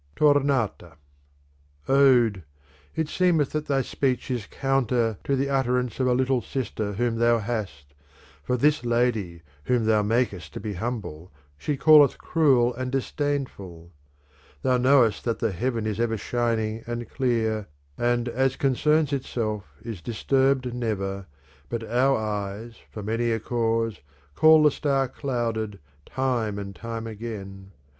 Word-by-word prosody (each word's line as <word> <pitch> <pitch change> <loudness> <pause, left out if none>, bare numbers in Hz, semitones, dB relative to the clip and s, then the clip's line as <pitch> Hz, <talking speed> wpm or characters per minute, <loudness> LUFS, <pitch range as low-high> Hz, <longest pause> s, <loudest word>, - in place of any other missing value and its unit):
Tornata 135 - +1 0.9
Ode! 125 -7 +4 0.5
it 160 -1 -1
seemeth 165 -4 +2
that 155 0 -3
thy 135 -2 +1
speech 130 0 -1
is 120 -5 -3
counter 125 -5 0
to 140 - 0
the 135 +1 0
utterance 125 -3 0
of 130 - +2
a 125 - +3
little 130 0 +1
sister 110 -2 -3
whom 115 +2 -1
thou 120 0 +4
hast; 100 -11 -5 0.5
for 125 - -1
this 150 +2 +2
lady 115 -8 0 0.2
whom 120 +1 +1
thou 110 -1 +3
makest 105 -7 -1
to - - -4
be 105 -2 -4
humble, 95 -6 -5 0.2
she 140 - -3
calleth 150 -1 +6
cruel 130 -7 +2
and 130 +1 -4
disdainful. 130 - -3 0.7
Thou 130 -1 +3
knowest 125 -4 +3
that 115 -2 0
the 115 - -1
heaven 115 +4 -2
is 110 0 -2
ever 115 -1 0
shining 115 0 -1
and 120 0 -4
clear, 110 -5 -1 0.3
and 120 +2 0
as 130 +2 0
concerns 150 +2 +2
itself 110 -6 -2 0.2
is 110 -7 -6
disturbed 130 +3 +1
never; 100 -5 -3 0.4
but 115 -1 -3
our 130 +4 +2
eyes, 105 +1 -4
for 105 - -8
many 115 +3 -1
a 115 - 0
cause, 115 -3 -1 0.3
call 155 - +6
the 150 - +6
star 135 -2 0
clouded, 115 -6 -3 0.3
time 120 -6 -1
and 100 -1 -6
time 115 +1 -6
again, 100 -4 -7
IS - - -19
'"! - - -34
120 Hz, 145 wpm, -25 LUFS, 110-130 Hz, 0.9 s, calleth